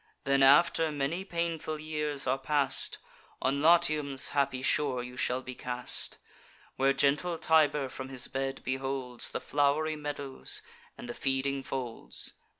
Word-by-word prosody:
Then, 140 0 +2
after 160 +3 +5
many 150 +5 -2
painful 170 -4 -3
years 150 -2 -2
are 130 +1 0
past, 140 0 +1 0.4
On 140 +2 0
Latium's 155 -4 +4
happy 140 -2 0
shore 135 -3 +1
you 125 0 -9
shall 125 +1 -1
be 130 - -7
cast, 125 0 -3 0.6
Where 135 +1 +3
gentle 145 +5 +1
Tiber 150 -4 +3
from 130 +1 -8
his 130 -2 +2
bed 135 0 -3
beholds 130 -1 -2
The - - -4
flow'ry 145 +4 +1
meadows, 145 - 0 0.3
and 240 - -9
the 240 - -5
feeding 135 - -1
folds. 130 -3 -3
140 Hz, 140 wpm, -30 LUFS, 135-155 Hz, 0.6 s, after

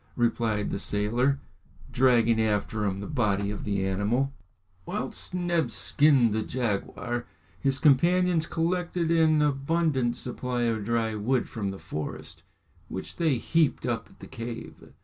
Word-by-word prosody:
replied 115 -3 0
the - - -2
sailor, 120 +8 +1 0.5
dragging 120 -3 +4
after 105 0 0
him 95 -1 -1
the - - -5
body 100 -7 0
of 105 - -6
the 100 -2 -1
animal. 105 +8 0 0.5
Whilst - - -5
Neb 175 -2 0
skinned 140 -7 +4
the 110 - 0
jaguar, 120 +1 -3 0.3
his 135 -2 +1
companions 170 +4 +3
collected 170 0 -1
an 160 -2 +4
abundant 140 -3 +1
supply 125 0 -3
of 110 -3 0
dry 115 -1 0
wood 120 +4 0
from 105 -4 -3
the 95 - -6
forest, 75 -5 -6 0.5
which 95 - -7
they 160 -5 +2
heaped 155 +5 +1
up - - -2
at - - -21
the - - -8
cave. 115 0 -8
120 Hz, 140 wpm, -27 LUFS, 105-150 Hz, 0.5 s, dragging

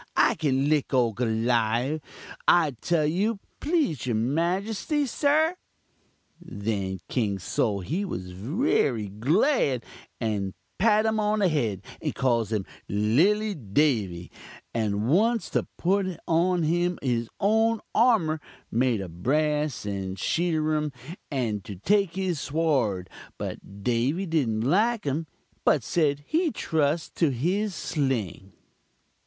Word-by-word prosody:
I - - +5
kin 140 -3 +1
lick 150 -2 +1
ole 120 -3 +3
Goliawh, 120 +4 +1 0.5
I 165 -4 +5
tell 165 -3 +2
you, 200 +8 +1 0.2
please 290 - 0
your 120 - +1
majuste, 190 - 0
sir.' 310 +7 +2 0.9
"Then 100 -2 -3
King 105 -6 0
Sol 100 +2 -1
he 165 - -2
wery 110 - -1
glad, 140 - +2 0.4
and 105 -4 -2 0.2
pat 215 +1 +4
um 220 0 +1
on 210 0 +1
the 200 -3 +3
head, 115 - -1 0.2
and - - -2
calls 115 -4 +1
um 105 -4 -1 0.2
'lilly 170 - +2
Davy,' 105 - 0 0.4
and 105 -1 0
wants 220 - +2
to - - 0
put 190 +2 +1 0.2
on 170 +1 +2
um 175 +2 +1
his 120 -3 0
own 220 +2 +3 0.2
armur 210 -10 +3 0.3
made 120 -3 +1
of 85 -2 -9
brass 150 +1 0
and 95 -2 -3
sheetirum 155 - 0 0.4
and 115 -8 -2
to 100 - -7
take 195 - +1
his 185 -5 -1
sword, 135 - 0 0.3
but 100 0 -7
Davy 125 - +1
didn't 135 -11 0
like 210 - +2
um, 150 +3 -1 0.4
but - - +3
said 145 -4 +1
he'd 325 - 0
trust 155 +1 0
to 165 - +3
his 180 - -1
sling. 115 - -2
150 Hz, 125 wpm, -26 LUFS, 110-185 Hz, 0.9 s, I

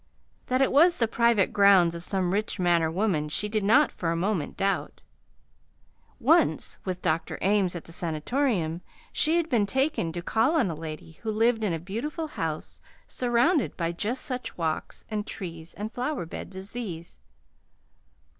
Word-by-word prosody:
That 255 +1 +3
it - - +1
was 340 +5 +5
the 230 - +2
private 235 -3 +2
grounds 195 -4 +6
of 170 0 -7
some 185 -1 0
rich 210 +2 -1
man 175 -2 +3
or 160 - +1
woman, 165 -4 0
she 210 +7 -1
did 215 -1 -1
not 265 +9 +5
for 170 - -3
a - - 0
moment 180 -2 -1
doubt. 195 0 -1 1.2
Once, - - +2
with 185 -1 -4
Dr. 160 -2 0
Ames 195 -2 +2
at 175 - -5
the - - -14
Sanatorium, 170 - -1 0.3
she 320 +2 +2
had 335 -2 +1
been 225 -8 +2
taken 265 - 0
to 175 0 -5
call 225 - +2
on 245 - +2
a - - -4
lady 155 0 -8
who 225 - -3
lived 225 +1 +2
in 205 - +1
a - - 0
beautiful 235 - -4
house 160 - -4 0.2
surrounded 250 +4 +1
by 170 -1 0
just 215 +9 -3
such 255 -2 -4
walks 160 -2 -3
and 210 -1 -2
trees 165 -3 -7
and 210 +2 -5
flower 255 - -2
beds 175 +3 -8
as 190 +1 -8
these. 180 -9 -6
200 Hz, 175 wpm, -27 LUFS, 170-240 Hz, 1.2 s, grounds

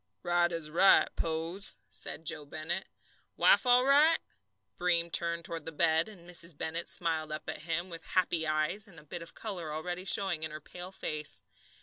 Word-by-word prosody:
"Right 175 0 +2
as 165 -3 -4
right, 195 +4 +6
Pose," 165 +5 -3 0.2
said 160 - -6
Joe 155 -1 0
Bennett. 155 +5 -4 0.5
"Wife - - +5
all 245 +1 +6
right?" 300 +4 +6 0.6
Breem 170 -1 +1
turned 170 0 +3
toward 165 -2 -5
the - - -3
bed, 160 +3 +2
and 175 -5 -14
Mrs. 170 -3 -3
Bennett 165 +3 -4
smiled 160 -2 0
up 155 - -5
at - - -4
him 165 +2 -2
with 165 -2 -7
happy 175 -3 +1
eyes, 155 +8 0
and 195 - -15
with 150 - -13
a - - -35
bit 170 - -6
of 165 - -9
colour 180 -8 -4
already 175 +4 -4
showing 190 -4 +3
in 160 - -2
her 155 0 -7
pale 180 +4 -7
face. 155 -5 -4
170 Hz, 190 wpm, -31 LUFS, 160-180 Hz, 0.6 s, right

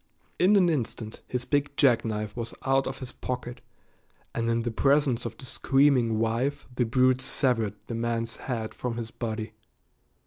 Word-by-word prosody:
In 190 +4 +5
an 190 -3 +5
instant 115 -7 -2
his 125 -1 -2
big 145 0 0
jackknife 110 -6 +2
was 115 -1 -5
out 135 0 +2
of - - -4
his 130 -2 -7
pocket 125 0 -5 0.7
and 115 0 -1
in 115 0 +1
the 120 - -1
presence 135 0 +2
of 115 -1 -9
the 130 - -10
screaming 130 -3 +3
wife 115 +5 -1
the 125 0 +1
brute 130 +2 +3
severed 115 -6 +1
the 115 - -6
man's 115 0 -1
head 115 -4 -4
from 120 -2 -4
his 115 -1 -5
body. 110 -2 -4
120 Hz, 165 wpm, -27 LUFS, 115-135 Hz, 0.7 s, In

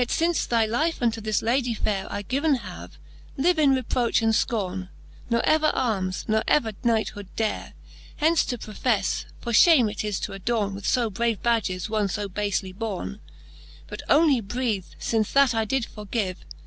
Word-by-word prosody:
Yet 245 - 0
fince 335 +1 +1
thy 230 -2 +2
life 305 +10 0
unto 230 -3 0
this 215 -1 -1
Ladie 240 0 +1
fayre 200 -2 -1
I 205 - -4
given 280 +7 +1
have, 195 -7 -9 0.4
live 335 +4 +2
in 280 -3 +5
reproch 245 -2 0
and 225 0 +3
fcorne 190 -5 -1
j - - -21 0.4
Ne 235 -1 +2
ever 310 0 +3
armes, 195 -7 -1
ne 220 0 +2
ever 230 -7 +2
knighthood 220 -4 0
dare 220 -1 -2 0.4
Hence 320 +2 +3
to 245 - -3
profefle: 215 -1 -1 0.2
for 235 - -4
fhame 235 - +5
is 210 -3 -2
to - - -4
adorne 200 +1 -1
With 200 +1 -6
fo 235 -3 +1
brave 230 +1 -1
badges 215 -6 0
one 215 -2 0
fo 205 +2 -3
bafely 195 -1 -2
borne 195 - -4
j - - -23 0.7
But - - -6
only 290 -5 +4
breath, 215 -2 -3
fith 220 -2 -1
that 275 -3 +5
I 225 -1 0
did 255 +2 0
forgive. 210 -3 -4
225 Hz, 175 wpm, -25 LUFS, 205-250 Hz, 0.7 s, in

